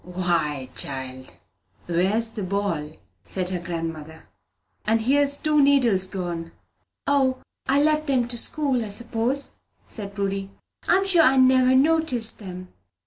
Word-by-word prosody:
"Why, 170 -7 -1
child, 130 -1 -4 0.5
where's 195 +7 0
the 215 - -6
ball?" 185 -6 -2 0.3
said 180 - -4
her 185 -1 -3
grandmother. 165 -2 -6 0.6
"And 225 +1 +1
here's 285 +3 +3
two 300 -1 +2
needles 245 -10 +3
gone!" 175 -3 -5 0.5
"O, 265 -2 +2 0.3
I 280 +2 +3
left 305 -1 +1
'em 250 -3 +1
to 240 - 0
school, 275 -5 +1
I - - -5
s'pose," 235 +5 0 0.4
said 200 -3 -5
Prudy. 195 -1 -3 0.4
"I'm 385 +2 +3
sure 365 -4 +5
I 270 -3 +4
never 260 0 +5
noticed 265 -6 +2
'em." 185 -2 -9
220 Hz, 135 wpm, -24 LUFS, 180-270 Hz, 0.6 s, sure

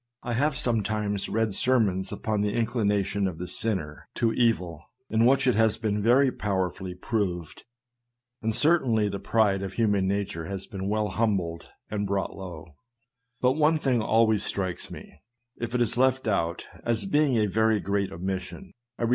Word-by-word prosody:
I 120 - -2
have 140 +4 +1
sometimes 105 -6 0
read 110 -2 0
sermons 100 -5 +1
upon 110 -2 -1
the 105 0 0
inclination 105 -4 0
of 90 -4 -5
the 90 +2 -5
sinner 90 -6 -4
to 115 -1 +1
evil, 90 -10 +1 0.3
in 110 +2 +4
which 135 +1 +3
it 125 - +4
has 110 -1 +3
been 105 -1 -1
very 125 +5 +4
powerfully 95 -3 -2
proved, 90 -5 -3 0.8
and 110 -1 -1
certainly 125 -10 +3
the 100 0 -4
pride 100 -1 +2
of 95 -1 -5
human 105 -4 +2
nature 95 -4 -2
has 95 -1 -5
been 95 0 -5
well 105 0 0
humbled 95 -6 -1 0.2
and 105 -1 -1
brought 100 0 -2
low; 85 -3 -9 0.6
but 125 - +4
one 155 +3 +3
thing 130 -6 +1
always 110 -1 +3
strikes 95 -3 -3
me, - - -11 0.4
if 120 +1 -4
it 125 - +2
is 115 - -2
left 130 -1 +2
out, 85 -5 0 0.2
as 115 -3 0
being 145 +2 +2
a 110 - +3
very 110 +1 +2
great 100 0 -1
omission; 95 - -5 0.2
viz. 115 - 0
105 Hz, 165 wpm, -27 LUFS, 95-115 Hz, 0.8 s, in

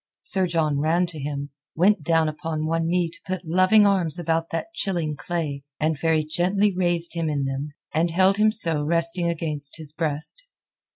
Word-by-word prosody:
Sir 190 -1 +1
John 155 -4 0
ran 165 +4 +2
to 170 -3 -7
him, 140 0 -5 0.2
went 190 +2 +3
down 160 +1 +2
upon 155 0 -3
one 165 +1 0
knee 175 0 +1
to 165 - -10
put 185 -1 -4
loving 185 +6 +4
arms 185 -5 +1
about 165 -1 -1
that 245 - -4
chilling 170 - -2
clay, 150 -3 -4 0.2
and 155 +1 +1
very 160 +2 +1
gently 185 +6 +1
raised 175 -2 +1
him 165 -2 -1
in 145 -2 -1
them, 135 +2 -4 0.2
and 165 +2 +1
held 190 +3 +3
him 215 +1 +4
so 165 -9 +1
resting 170 +3 +1
against 155 -4 +2
his 155 -2 -8
breast. 155 - -2
165 Hz, 180 wpm, -24 LUFS, 155-180 Hz, 0.2 s, loving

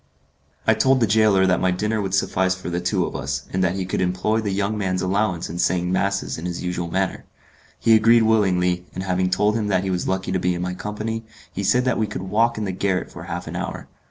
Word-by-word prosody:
I 110 - +5
told 130 +4 +3
the 115 - +4
gaoler 105 -2 +4
that 90 -1 +2
my 95 - +3
dinner 105 +4 0
would 95 -1 -1
suffice 95 -1 +1
for 95 -1 -6
the 85 +1 -1
two 90 0 0
of - - -6
us, 70 +1 -3
and 95 0 +1
that 90 0 +1
he 95 -1 -2
could 95 - -2
employ 95 +5 0
the 105 - -2
young 100 +2 -1
man's 95 -3 -1
allowance 95 -2 0
in 85 - -6
saying 90 -1 +1
masses 100 -2 -1
in 85 - -4
his 85 -1 -4
usual 90 -1 -3
manner. 95 +2 -1 0.6
He 115 - +4
agreed 115 +1 +6
willingly, 90 -5 +2
and 95 - -3
having 90 -1 0
told 105 +3 +2
him 110 -2 -1
that 95 -2 +1
he 95 - -1
was 90 -1 -2
lucky 95 0 -1
to 95 - 0
be 90 0 0
in 85 - -4
my 90 0 -2
company, 110 +4 -4 0.3
he 100 - -3
said 125 +6 +3
that 125 -3 +1
we 110 - +1
could 90 - -5
walk 115 +5 +1
in 110 - -2
the 95 - -2
garret 95 0 -1
for - - -9
half - - -5
an - - -7
hour. - - -5
95 Hz, 250 wpm, -22 LUFS, 90-105 Hz, 0.6 s, agreed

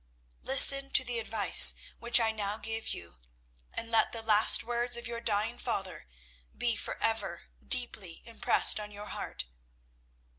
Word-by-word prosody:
Listen 275 +1 +5
to 265 - +2
the 245 -2 -5
advice 220 -2 +5 0.2
which 235 +1 +2
I 225 -1 -1
now 210 -1 -6
give 225 0 -7
you, 85 -8 -9 0.5
and 230 0 -9
let 225 -1 +1
the 225 -1 -8
last 215 -1 +4
words 240 +1 -4
of 235 - -10
your 235 0 -8
dying 220 +2 -4
father 190 - -7 0.5
be 235 -2 -2
for - - -8
ever 225 0 -4 0.2
deeply 220 -9 0
impressed 230 -1 +2
on 210 0 -9
your 205 0 -12
heart. - - -7
225 Hz, 150 wpm, -28 LUFS, 210-240 Hz, 0.5 s, Listen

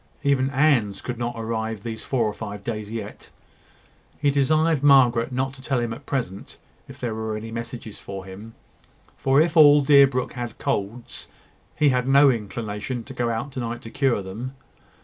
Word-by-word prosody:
Even 135 -2 +2
Anne's 135 -8 +2
could 125 -2 -6
not 120 0 -3
arrive 110 -2 -3
these 110 -1 -5
four 125 -4 0
or 105 - -1
five 105 -2 -7
days 105 -2 -4
yet. 115 0 -7 0.9
He 145 -1 +2
desired 155 +2 +2
Margaret 130 -4 +5
not 130 +1 -2
to 135 - -13
tell 130 -1 -1
him 120 -1 -2
at 135 +4 -12
present 110 -9 -4 0.3
if - - -12
there 120 -3 -3
were 110 -1 -3
any 115 +1 -7
messages 115 -2 -7
for 95 -1 -8
him; 105 +4 -11 0.6
for, 135 +1 +2
if 160 +1 +2
all 145 -2 +8
Deerbrook 140 -3 +4
had 120 -3 -6
colds, 110 +4 -4 0.5
he 150 -1 +3
had 125 -1 0
no 140 +1 +6
inclination 110 +1 -4
to 135 - -10
go 120 -2 -1
out 115 +5 -3
to 130 - -6
night 120 0 -4
to 115 - -9
cure 130 -8 +1
them. 115 +8 -7
120 Hz, 180 wpm, -24 LUFS, 110-135 Hz, 0.9 s, all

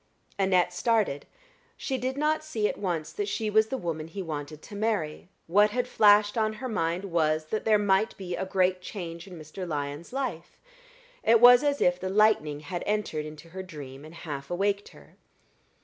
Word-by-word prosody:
Annette 185 -2 +3
started. 210 -8 0 0.5
She 265 -2 -3
did 260 +2 -2
not 305 +1 +1
see 225 -9 -1
at - - -4
once 170 -6 -2
that 410 -1 -3
she 220 - -2
was 220 +1 +4
the 265 - -3
woman 160 -6 -4
he 190 +4 -6
wanted 155 -1 -6
to 205 - -10
marry; 200 -7 -2 0.2
what 205 +5 +4
had 245 +3 -1
flashed 210 0 +4
on 215 0 +1
her 250 +4 -6
mind 180 -4 -1
was, 155 -3 +1
that 215 - -2
there 215 -1 +5
might 205 +1 +1
be 180 -2 -4
a - - -3
great 185 -1 +1
change 170 -2 -7
in 180 -2 -10
Mr. 160 +4 -7
Lyon's 145 +1 -4
life. 245 -11 -4 0.6
It 230 0 +5
was 245 +2 +8
as 285 -1 +1
if 180 0 +3
the 185 - -3
lightning 190 -8 +3
had 170 +4 -5
entered 195 -8 -1
into 155 +2 -11
her 190 +3 -6
dream 145 -7 -9
and 155 +2 -12
half 145 -4 -7
awaked 200 +3 -1
her. - - -18
190 Hz, 190 wpm, -27 LUFS, 165-215 Hz, 0.6 s, was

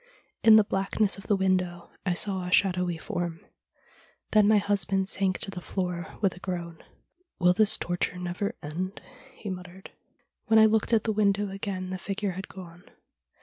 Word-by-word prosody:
In 225 -1 +8
the 215 - +7
blackness 195 +1 0
of 195 - -12
the 205 - +3
window 185 -2 -1 0.2
I 180 - +2
saw 190 0 +1
a - - -5
shadowy 180 -3 +2
form. 170 0 -4 0.9
Then 210 -1 +5
my 215 0 +5
husband 195 -2 +1
sank 190 -1 +1
to 195 - -3
the 180 - -7
floor 180 -1 -4
with 195 -4 +1
a - - -12
groan. 175 -3 -5 0.3
" 355 +1 -46
Will 180 0 +5
this 210 +2 +3
torture 175 +1 -2
never 180 +5 -3
end? 180 +7 -4 0.2
" 270 0 -21
he 205 - -5
muttered. 180 +1 -9 0.3
' - - -46
When 220 -1 +5
I 220 - +8
looked 220 +1 +2
at 225 -2 +3
the 220 - 0
window 205 -1 +1
again 190 -2 -4
the 185 - -4
figure 200 +1 -3
had 190 +2 -7
gone. 175 -2 -12
190 Hz, 190 wpm, -27 LUFS, 180-205 Hz, 0.9 s, In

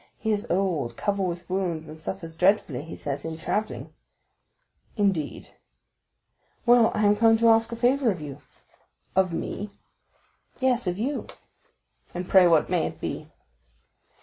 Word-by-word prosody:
"He 220 - -1
is 210 +2 -1
old, 175 -9 0
covered 200 -2 0
with 175 0 -5
wounds, 180 -4 -2
and 155 +1 -10
suffers 165 0 -5
dreadfully, 180 -7 +2
he 165 +2 -8
says, 140 -1 -4
in 160 -1 -5
travelling." 215 +6 -3 1.0
"I - - -1
understand; 175 -7 -1 1.1
well, 240 -1 +6
I 215 0 +2
am 205 0 +5
come 225 +1 +5
to 230 +1 +4
ask 225 0 +4
a - - -3
favor 250 +2 +2
of 185 -5 -1
you." 145 -2 -7 0.8
"Of 190 -1 +3
me?" 205 +5 -4 0.9
"Yes, 255 -4 +1
of 180 0 -1
you." 270 +7 -2 0.9
"And 180 +1 -4
pray 185 -2 +6
what 165 -3 +4
may - - +1
it - - -9
be?" - - -5
190 Hz, 150 wpm, -26 LUFS, 165-225 Hz, 1.1 s, well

